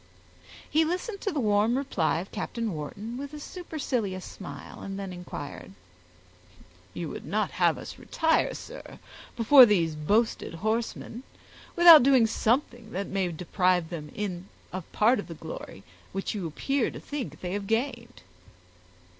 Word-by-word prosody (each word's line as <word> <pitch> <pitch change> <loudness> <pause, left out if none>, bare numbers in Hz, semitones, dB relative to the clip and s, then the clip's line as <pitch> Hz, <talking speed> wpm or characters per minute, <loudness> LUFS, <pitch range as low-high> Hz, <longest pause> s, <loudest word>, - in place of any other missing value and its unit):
He 315 +2 +3
listened 365 +6 -3
to 400 - -1
the 300 - -2
warm 215 +1 +2
reply 205 - 0
of 190 - -10
Captain 230 -4 -3
Wharton 200 +10 -6
with 285 +1 -7
a - - -7
supercilious 255 - -3
smile, 195 - -9
and 195 0 -5
then 195 -2 -5
inquired,— 175 - -8 1.2
"You 170 - -3
would - - -7
not 215 +1 -1
have - - +4
us - - -9
retire, 320 -1 +1
sir, - - -10 0.4
before 245 +2 +9
these 170 -7 +2
boasted 205 +4 0
horsemen, 225 +4 -2 0.5
without 340 -3 +10
doing 260 -2 +5
something 235 0 0
that 200 +2 -2
may 190 -2 0
deprive 180 0 +1
them 175 +3 -5 0.3
of 185 -2 -6
part 225 +3 +3
of - - -6
the 165 - -8
glory 155 -11 -8 0.3
which 195 0 -2
you 195 -5 -3
appear 270 - 0
to - - -8
think 290 -4 -6
they 180 0 -3
have 200 -1 -3
gained!" 235 +1 -2
215 Hz, 145 wpm, -28 LUFS, 180-260 Hz, 1.2 s, without